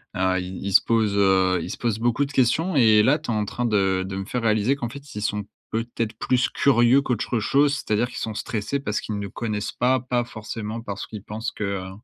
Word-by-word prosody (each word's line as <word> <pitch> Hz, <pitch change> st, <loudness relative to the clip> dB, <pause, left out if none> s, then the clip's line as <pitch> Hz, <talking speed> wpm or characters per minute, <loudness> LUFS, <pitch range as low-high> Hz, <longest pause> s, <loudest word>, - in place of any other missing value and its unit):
Heu, 95 Hz, 0 st, +1 dB
ils 90 Hz, 0 st, -6 dB
ils 100 Hz, -, -2 dB
se -, -, +8 dB
posent, 110 Hz, -3 st, +1 dB
heu, 95 Hz, -2 st, +3 dB
ils 90 Hz, -, -5 dB
se -, -, -6 dB
posent 115 Hz, -3 st, -1 dB
beaucoup 120 Hz, +4 st, +1 dB
de 140 Hz, -, -9 dB
questions 145 Hz, +7 st, +2 dB
et 110 Hz, -5 st, +6 dB
là, 130 Hz, +8 st, +4 dB
tu 150 Hz, -6 st, -5 dB
es -, -, 0 dB
en 105 Hz, -1 st, 0 dB
train 120 Hz, +4 st, -3 dB
de 95 Hz, -4 st, +2 dB
de 95 Hz, -, -5 dB
me 95 Hz, 0 st, -4 dB
faire 120 Hz, +3 st, -3 dB
réaliser 110 Hz, +4 st, +2 dB
qu'en 120 Hz, -4 st, -4 dB
fait 140 Hz, +2 st, -11 dB
ils 105 Hz, -, -4 dB
sont 105 Hz, -1 st, -1 dB, 0.3 s
peut-être 115 Hz, 0 st, -2 dB
plus 125 Hz, -1 st, +2 dB
curieux 125 Hz, 0 st, +4 dB
qu'autre 120 Hz, -2 st, -1 dB
chose, 140 Hz, +6 st, +3 dB
c'est-à-dire 115 Hz, -4 st, 0 dB
qu'ils -, -, -10 dB
sont 110 Hz, -2 st, -4 dB
stressés 115 Hz, +6 st, -2 dB
parce 105 Hz, -6 st, -2 dB
qu'ils 105 Hz, -, -4 dB
ne 100 Hz, 0 st, -4 dB
connaissent 105 Hz, 0 st, -3 dB
pas, 130 Hz, +1 st, +2 dB
pas 125 Hz, 0 st, -1 dB
forcément 110 Hz, 0 st, -6 dB
parce 100 Hz, -4 st, -6 dB
qu'ils 105 Hz, -3 st, -8 dB
pensent 110 Hz, +3 st, -4 dB
que -, -, -6 dB
heu 100 Hz, -2 st, -3 dB
110 Hz, 240 wpm, -24 LUFS, 100-125 Hz, 0.3 s, se